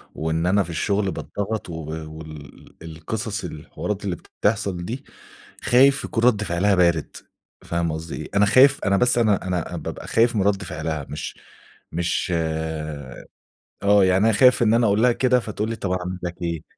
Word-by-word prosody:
وإن 80 Hz, +2 st, -1 dB
أنا 100 Hz, +2 st, +3 dB
في 85 Hz, -, -10 dB
الشغل 100 Hz, +4 st, 0 dB
باتضغط 105 Hz, 0 st, -4 dB
وب 80 Hz, -2 st, -6 dB, 0.2 s
وال 75 Hz, -2 st, -12 dB
القصص 100 Hz, +7 st, -5 dB
الحوارات 95 Hz, +5 st, -5 dB
اللي 90 Hz, -3 st, -1 dB
بتحصل 100 Hz, -2 st, -2 dB
دي، 130 Hz, +7 st, -6 dB, 0.6 s
خايف 135 Hz, +3 st, +4 dB
يكون 115 Hz, 0 st, -2 dB
رد 105 Hz, -4 st, +4 dB
فعلها 95 Hz, +2 st, +1 dB
بارد، 85 Hz, -4 st, +1 dB, 0.5 s
فاهمة 85 Hz, -2 st, -1 dB
قصدي 80 Hz, +1 st, -6 dB
إيه؟ 75 Hz, -, -7 dB
أنا 105 Hz, +1 st, +5 dB
خايف 135 Hz, +6 st, +6 dB
أنا 100 Hz, 0 st, +3 dB
بس 125 Hz, +2 st, +3 dB
أنا 105 Hz, -5 st, +2 dB
أنا 90 Hz, -3 st, -2 dB
بابقى -, -, -7 dB
خايف 115 Hz, +1 st, +2 dB
من 100 Hz, -, +2 dB
رد 100 Hz, 0 st, +1 dB
فعلها، 80 Hz, -4 st, -4 dB
مش -, -, -6 dB, 0.5 s
مش 85 Hz, +1 st, -1 dB, 1.5 s
آه 100 Hz, -1 st, +5 dB
يعني 95 Hz, +3 st, +3 dB
أنا 115 Hz, -, +4 dB
خايف 125 Hz, +2 st, +5 dB
إن 110 Hz, 0 st, +4 dB
أنا 115 Hz, 0 st, +3 dB
أقول 105 Hz, +2 st, +2 dB
لها 125 Hz, -1 st, +5 dB
كده 125 Hz, 0 st, +2 dB
فتقول 110 Hz, 0 st, -4 dB
لي 115 Hz, -, -3 dB
طب 100 Hz, -4 st, -4 dB
أعمل 90 Hz, 0 st, -3 dB
لك 90 Hz, 0 st, -6 dB
إيه؟ 85 Hz, -2 st, -3 dB
100 Hz, 170 wpm, -23 LUFS, 85-110 Hz, 1.5 s, خايف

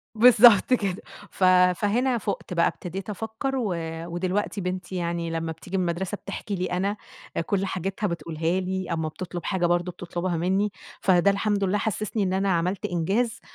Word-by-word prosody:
بالضبط 235 Hz, 0 st, +7 dB
كده 195 Hz, -5 st, -1 dB, 0.3 s
ف 185 Hz, -, -1 dB, 0.3 s
فهنا 240 Hz, +4 st, +1 dB
فُقت 180 Hz, -, -4 dB
بقى 170 Hz, -, +3 dB
ابتديت 190 Hz, +3 st, -4 dB
أفكّر 225 Hz, +6 st, -3 dB
و 210 Hz, -8 st, 0 dB, 0.3 s
ودلوقتي 185 Hz, +4 st, -2 dB
بنتي 185 Hz, 0 st, -4 dB
يعني 170 Hz, -1 st, -2 dB
لمّا 165 Hz, 0 st, -2 dB
بتيجي 180 Hz, +4 st, -6 dB
من 185 Hz, -, +1 dB
المدرسة 190 Hz, +4 st, -2 dB
بتحكي 200 Hz, +1 st, -6 dB
لي 185 Hz, 0 st, -1 dB
أنا، 195 Hz, +4 st, -1 dB, 0.5 s
كل 195 Hz, -1 st, 0 dB
حاجتها 195 Hz, +3 st, -2 dB
بتقولها 170 Hz, 0 st, -1 dB
لي 185 Hz, -1 st, -3 dB
أما 160 Hz, -1 st, -1 dB
بتطلب 175 Hz, +1 st, -6 dB
حاجة 185 Hz, -3 st, +1 dB
برضه 175 Hz, +1 st, +1 dB
بتطلبها 175 Hz, 0 st, -3 dB
مني، 190 Hz, +4 st, +1 dB, 0.3 s
فده 190 Hz, +1 st, +4 dB
الحمد 200 Hz, 0 st, 0 dB
لله 200 Hz, +2 st, +1 dB
حسسني 215 Hz, 0 st, -1 dB
إن 185 Hz, -1 st, 0 dB
أنا 195 Hz, +1 st, +1 dB
عملت 175 Hz, +3 st, 0 dB
إنجاز 195 Hz, +8 st, 0 dB
190 Hz, 165 wpm, -25 LUFS, 175-205 Hz, 0.5 s, بالضبط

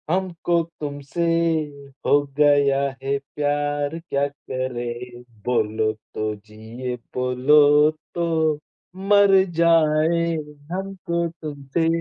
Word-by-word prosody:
हमको 175 Hz, -1 st, 0 dB, 0.2 s
तुमसे 145 Hz, +2 st, -4 dB, 0.8 s
हो 145 Hz, -, +5 dB, 0.2 s
गया 145 Hz, -2 st, +4 dB, 0.2 s
है 140 Hz, +1 st, 0 dB, 0.2 s
प्यार 145 Hz, +1 st, -1 dB
क्या 140 Hz, -4 st, -1 dB
करे. 125 Hz, -3 st, -5 dB, 0.2 s
बोलो 110 Hz, -2 st, +1 dB, 0.2 s
तो 110 Hz, 0 st, -2 dB
जिये 110 Hz, +4 st, -7 dB, 0.2 s
बोलो 145 Hz, +4 st, +4 dB, 0.2 s
तो 170 Hz, -1 st, 0 dB, 0.8 s
मर 200 Hz, -1 st, +6 dB, 0.3 s
जाये 165 Hz, 0 st, +3 dB, 0.4 s
हमको 185 Hz, -2 st, -2 dB
तुमसे. 150 Hz, +1 st, -2 dB
145 Hz, 85 wpm, -22 LUFS, 125-165 Hz, 0.8 s, मर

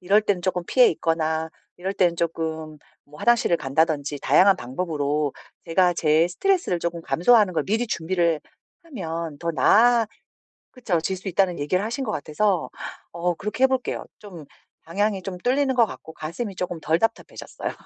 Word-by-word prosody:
이럴 195 Hz, +4 st, +4 dB
때는 205 Hz, -4 st, 0 dB
쪼끔 180 Hz, -2 st, -1 dB
피해 250 Hz, -2 st, +5 dB
있거나 160 Hz, 0 st, -1 dB, 0.3 s
이럴 190 Hz, +2 st, -3 dB
때는 175 Hz, -3 st, +2 dB
쪼끔 160 Hz, -2 st, -3 dB, 0.3 s
뭐 150 Hz, +1 st, -16 dB
화장실을 235 Hz, -7 st, +3 dB
간다든지 145 Hz, 0 st, 0 dB
다양한 195 Hz, +1 st, +5 dB
방법으로 145 Hz, +1 st, -2 dB, 0.3 s
제가 175 Hz, +1 st, +3 dB
제 160 Hz, +1 st, +3 dB
스트레스를 345 Hz, -, 0 dB
조금 170 Hz, 0 st, -3 dB
감소하는 205 Hz, +2 st, +4 dB
걸 -, -, 0 dB
미리 225 Hz, +4 st, 0 dB
준비를 170 Hz, -3 st, 0 dB, 0.4 s
하면 165 Hz, -, -5 dB
더 170 Hz, -, -2 dB
나아 230 Hz, -, +4 dB, 0.7 s
그쵸 205 Hz, -10 st, -1 dB
...질 190 Hz, +3 st, -2 dB
수 190 Hz, -, -10 dB
있다는 180 Hz, -2 st, +1 dB
얘기를 180 Hz, +7 st, 0 dB
하신 230 Hz, +5 st, -3 dB
것 215 Hz, -, -2 dB
같아서 180 Hz, +3 st, 0 dB, 0.4 s
어 175 Hz, +1 st, -1 dB
그렇게 210 Hz, +8 st, -3 dB
해볼게요. 260 Hz, -1 st, -1 dB
좀 175 Hz, -8 st, -11 dB, 0.4 s
방향이 195 Hz, +3 st, -1 dB
좀 185 Hz, -2 st, -5 dB
뚫리는 265 Hz, +5 st, +1 dB
것 235 Hz, -2 st, +5 dB
같고 160 Hz, -5 st, -10 dB
가슴이 185 Hz, +7 st, -5 dB
쪼끔 175 Hz, -2 st, -4 dB
덜 160 Hz, +1 st, +1 dB
답답해졌어요. 225 Hz, -, -3 dB
175 Hz, 355 characters per minute, -24 LUFS, 160-210 Hz, 0.7 s, 피해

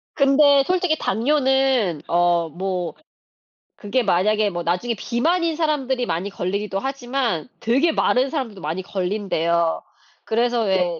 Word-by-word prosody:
근데 280 Hz, 0 st, +5 dB
솔직히 360 Hz, -2 st, +1 dB
당뇨는 265 Hz, -, +1 dB
어 175 Hz, -1 st, +2 dB
뭐 180 Hz, +1 st, -3 dB, 0.8 s
그게 240 Hz, +5 st, -1 dB
만약에 210 Hz, +2 st, +2 dB
뭐 175 Hz, -2 st, -4 dB
나중에 180 Hz, +8 st, -1 dB
비만인 325 Hz, -, 0 dB
사람들이 275 Hz, -6 st, 0 dB
많이 185 Hz, -1 st, -2 dB
걸리기도 195 Hz, +1 st, -3 dB
하지만 255 Hz, -, -2 dB
되게 270 Hz, +9 st, +2 dB
마른 260 Hz, -3 st, +1 dB
사람들도 250 Hz, -, -4 dB
많이 160 Hz, +4 st, -3 dB
걸린대요. 180 Hz, -4 st, -1 dB, 0.4 s
그래서 235 Hz, +1 st, 0 dB
왜 180 Hz, -4 st, 0 dB
220 Hz, 290 characters per minute, -22 LUFS, 180-270 Hz, 0.8 s, 근데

